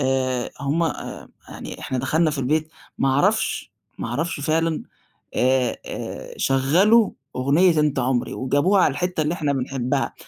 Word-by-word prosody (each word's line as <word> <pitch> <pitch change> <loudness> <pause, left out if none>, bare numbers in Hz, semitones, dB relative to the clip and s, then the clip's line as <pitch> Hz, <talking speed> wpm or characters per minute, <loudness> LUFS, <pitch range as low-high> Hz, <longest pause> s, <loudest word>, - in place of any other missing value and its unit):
آآ، 130 -2 0
هُم 145 +5 0
آآ 165 - -4 0.2
يعني - - -8
إحنا 130 - -3
دخلنا 155 +5 +2
في 150 - -4
البيت، 155 +4 0 0.3
ما 135 - +2
أعرفش، 135 +2 +1 0.3
ما - - -3
أعرفش 145 +6 -2
فعلًا، 160 +2 0 0.5
آآ 130 -1 +2
آآ - - -6
شغَّلوا 180 - +4 0.3
أغنية 155 +6 +3
أنت 150 -2 +1
عمري، 125 -1 0
وجابوها 145 +9 +2
على - - +3
الحتّة 180 +3 -2
اللي 155 +3 0
إحنا 150 -4 0
بنحبها، 130 -1 -1
145 Hz, 145 wpm, -23 LUFS, 130-165 Hz, 0.5 s, شغَّلوا